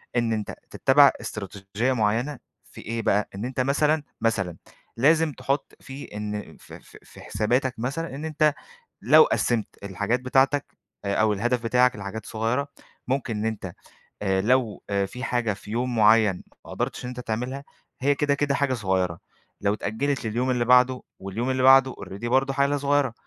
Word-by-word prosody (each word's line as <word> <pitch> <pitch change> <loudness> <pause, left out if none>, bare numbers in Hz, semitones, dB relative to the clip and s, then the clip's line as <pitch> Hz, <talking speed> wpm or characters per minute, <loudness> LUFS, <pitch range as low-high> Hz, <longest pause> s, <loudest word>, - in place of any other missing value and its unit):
إن 120 -2 +1
أنتَ 105 -2 -3 0.2
تتَّبِع 140 +1 +5
إستراتيجية 105 +3 -3
معيَّنة 120 +5 0 0.2
في - - -13
إيه 115 +1 -3
بقى، 105 -1 +1
إن 100 +4 -4
أنتَ 130 +1 -5
مثلًا، 150 +3 +2 0.2
مثلًا، 95 -7 0 0.4
لازِم 155 +5 +4
تحُطّ 140 +1 -3
فيه 135 +2 -9
إن 105 0 -5
ف - - -15
ف - - -13
في - - -15
حساباتَك 125 +4 0
مثلًا، 140 +5 -3
إن 150 +3 -6
أنتَ 155 -1 +2 0.5
لو - - +7
قسَّمت 120 - 0 0.2
الحاجات 100 +5 -1
بتاعتَك 135 +2 +1 0.3
آآ 100 - 0
أو 110 -1 +3
الهدف 120 +4 -1
بتاعك 125 +2 +3
لحاجات 100 +1 -6
صغيرة، 115 +6 -1 0.4
ممكن 125 -4 -1
إن 105 - -2
أنتَ 105 -5 -3 0.5
آآ 95 -1 +1
لو 120 -1 +1
آآ 100 -1 +1
في 125 +6 -8
حاجة 120 -4 0
في 105 +1 -11
يوم 120 +2 -1
معيَّن 105 -3 +4 0.2
ما - - -11
قدِرتِش - - -3
إن - - -4
أنتَ 125 0 -7
تعملها، 125 +4 -4 0.4
هي 140 +2 +3
كده 145 0 +1
كده 140 -1 0
حاجة 140 -2 +1
صغيرة، 95 -6 -1 0.4
لو 100 0 +2
اتأجَّلت 120 +6 -2
لليوم 120 +4 -1
اللي 120 -2 0
بعده، 125 +1 +4 0.2
واليوم 105 +7 -3
اللي 130 0 0
بعده 135 0 +7
already 100 +5 -7
برضه 135 +2 +2
حاجة 140 +1 +2
صغيرة، 140 -3 +1
120 Hz, 170 wpm, -25 LUFS, 105-135 Hz, 0.5 s, لو